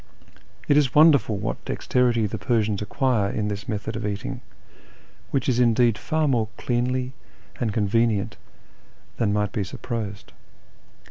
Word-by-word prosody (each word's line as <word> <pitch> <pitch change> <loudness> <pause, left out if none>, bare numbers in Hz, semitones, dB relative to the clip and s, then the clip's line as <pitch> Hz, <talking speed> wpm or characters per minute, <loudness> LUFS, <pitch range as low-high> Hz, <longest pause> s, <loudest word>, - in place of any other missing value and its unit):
It 145 - +4
is 140 -4 +2
wonderful 150 -8 +5
what - - -4
dexterity 120 -3 +1
the 105 +1 -4
Persians 105 0 0
acquire 110 -1 +1
in 105 0 -2
this 100 +2 -5
method 105 0 -3
of 115 - -4
eating, 100 -1 -4 0.9
which 135 +1 -1
is 125 -2 +2
indeed 120 -1 +4
far 155 +8 0
more 120 -5 +1
cleanly 125 +1 -1 0.5
and 115 -4 0
con 105 0 0
venient 115 -2 +1 0.8
than 110 -3 +1
might 105 -1 0
be 105 - -1
supposed. 100 0 -5
115 Hz, 140 wpm, -24 LUFS, 105-125 Hz, 0.9 s, wonderful